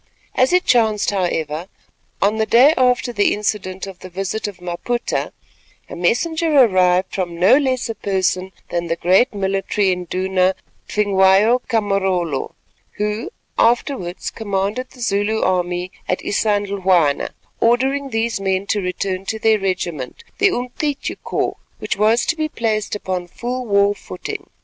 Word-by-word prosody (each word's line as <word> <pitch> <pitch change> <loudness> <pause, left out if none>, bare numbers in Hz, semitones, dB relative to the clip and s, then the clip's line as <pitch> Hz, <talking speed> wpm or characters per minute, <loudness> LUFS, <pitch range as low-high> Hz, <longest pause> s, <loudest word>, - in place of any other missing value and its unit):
As 255 +1 +3
it 360 0 +3
chanced, 220 -4 +3
however, 170 -4 -2 0.6
on 210 +2 +2
the 220 0 0
day 265 +6 +6
after 250 -1 +2
the 205 -2 +2
incident 200 -3 -3
of 190 -2 -10
the 185 - -10
visit 195 +4 -3
of 205 - -7
Maputa, 180 +8 -2 0.6
a - - -5
messenger 320 - +1
arrived 185 -9 +4
from 175 -3 -3
no 185 +7 +6
less 260 -3 +1
a 225 - -3
person 190 -2 -1 0.2
than 170 0 -1
the 165 - 0
great 185 +10 +3
military 195 -1 0
Induna, 185 +1 0 0.3
Tvingwayo 205 +3 +4
ka 230 -3 +2
Marolo, 190 -8 -1 0.4
who 210 - -2 0.3
afterwards 230 -6 0
commanded 205 +4 -2
the 250 - -15
Zulu 215 0 0
army 180 0 0 0.2
at 185 - +1
Isandhlwana, 195 -7 +1 0.3
ordering 265 +4 +2
these 225 -2 -1
men 190 0 0
to 205 - +1
return 185 +1 -3
to 220 - -2
their 220 -1 +3
regiment, 175 -9 -3 0.2
the 395 0 +5
Umcityu 280 +1 -3
Corps, - - -2 0.2
which - - -3
was 220 +3 +3
to 330 - 0
be 310 -1 -2
placed 215 -5 -1
upon 185 -3 -3
full 245 +6 -4
war 200 0 +3
footing. - - -7
200 Hz, 145 wpm, -20 LUFS, 185-235 Hz, 0.6 s, day